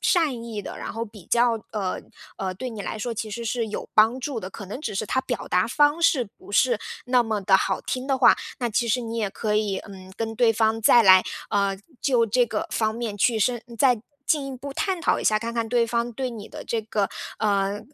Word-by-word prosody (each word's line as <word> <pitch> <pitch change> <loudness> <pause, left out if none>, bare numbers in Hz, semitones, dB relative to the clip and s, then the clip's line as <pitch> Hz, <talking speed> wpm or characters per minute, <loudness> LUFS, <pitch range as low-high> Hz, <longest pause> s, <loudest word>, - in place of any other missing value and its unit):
善 290 -10 +1
意 215 -3 -5
的， - - -7
然 - - -5
后 230 +1 -3
比 210 -5 -14
较 235 -2 +2
呃， 195 -4 -2 0.4
呃， 185 -1 -3
对 250 +6 -5
你 215 -2 -7
来 205 - -4
说 235 +2 -3
其 220 0 -4
实 235 +1 -5
是 230 0 -1
有 210 - -5
帮 225 +4 +5
助 260 -3 -3
的， 185 - -6
可 200 - -9
能 230 +9 -6
只 215 -9 -4
是 210 - -1
他 260 +5 0
表 245 - -4
达 180 +3 +2
方 295 +6 +3
式 280 -7 +3
不 200 - -13
是 240 0 +3 0.3
那 250 -1 +4
么 215 -2 -1
地 190 0 +5
好 - - -1
听 255 +1 -4
的 270 -1 +1
话， 255 - +6 0.2
那 240 -2 0
其 235 +3 +1
实 240 +3 +1
你 230 -1 -5
也 210 -3 0
可 210 +1 -1
以， 205 -3 0
嗯， 190 -2 -11
跟 225 -1 -3
对 235 -2 +4
方 220 0 +1
再 235 +2 +6
来， 185 -2 +7 0.3
呃， 200 -1 +1 0.2
就 250 -5 +3
这 240 +3 +2
个 215 -1 -3
方 220 -1 0
面 225 -3 -4
去 225 +1 +2
深 240 +2 +1 0.2
再 250 -2 +3 0.2
进 290 -3 +1
一 265 -1 -6
步 280 +2 -7
探 380 +1 -1
讨 - - +2
一 - - -5
下， 215 - +4
看 230 +2 -3
看 230 -1 -2
对 240 -1 +3
方 235 +1 -1
对 255 +1 -3
你 220 -3 -8
的 - - -8
这 230 - -1
个， 210 -2 -1 0.3
呃， 200 -1 +1
225 Hz, 260 characters per minute, -24 LUFS, 210-245 Hz, 0.4 s, 来